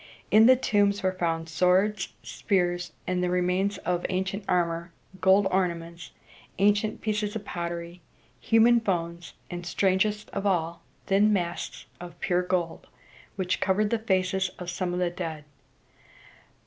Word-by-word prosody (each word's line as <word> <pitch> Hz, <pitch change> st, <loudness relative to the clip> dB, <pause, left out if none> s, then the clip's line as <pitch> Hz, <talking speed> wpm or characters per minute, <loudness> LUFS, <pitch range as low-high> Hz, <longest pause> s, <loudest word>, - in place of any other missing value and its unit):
In 220 Hz, +2 st, +7 dB
the 260 Hz, -, +8 dB
tombs 205 Hz, -5 st, +1 dB
were 185 Hz, -, +2 dB
found 165 Hz, -3 st, -2 dB
swords, 185 Hz, +5 st, +2 dB, 0.2 s
spears, 175 Hz, -4 st, -1 dB
and 180 Hz, 0 st, -1 dB
remains 180 Hz, +2 st, 0 dB
of 180 Hz, -1 st, -2 dB
ancient 190 Hz, +2 st, -2 dB
armor, 170 Hz, -1 st, 0 dB, 0.3 s
gold 190 Hz, +2 st, +4 dB
ornaments, 170 Hz, -2 st, -2 dB, 0.5 s
ancient 205 Hz, +2 st, +2 dB
pieces 210 Hz, -1 st, -2 dB
of 210 Hz, -2 st, -5 dB
pottery, 170 Hz, 0 st, -5 dB, 0.4 s
human 235 Hz, +1 st, +5 dB
bones, 170 Hz, -5 st, -3 dB, 0.2 s
and, 175 Hz, 0 st, -5 dB
strangest 195 Hz, +4 st, 0 dB
of -, -, -3 dB
all, 170 Hz, -3 st, 0 dB, 0.2 s
thin 205 Hz, +2 st, +3 dB
masks 175 Hz, -4 st, -2 dB
of 175 Hz, -1 st, -10 dB
pure 180 Hz, 0 st, +1 dB
gold, 180 Hz, -2 st, -2 dB, 0.5 s
which 185 Hz, -2 st, -1 dB
covered 205 Hz, +2 st, +1 dB
the 230 Hz, -, +1 dB
faces 190 Hz, -3 st, 0 dB
of 180 Hz, -1 st, -5 dB
some 180 Hz, 0 st, -2 dB
of 175 Hz, -, -2 dB
the 180 Hz, -1 st, 0 dB
dead. 165 Hz, -4 st, -5 dB
185 Hz, 135 wpm, -27 LUFS, 175-205 Hz, 0.5 s, the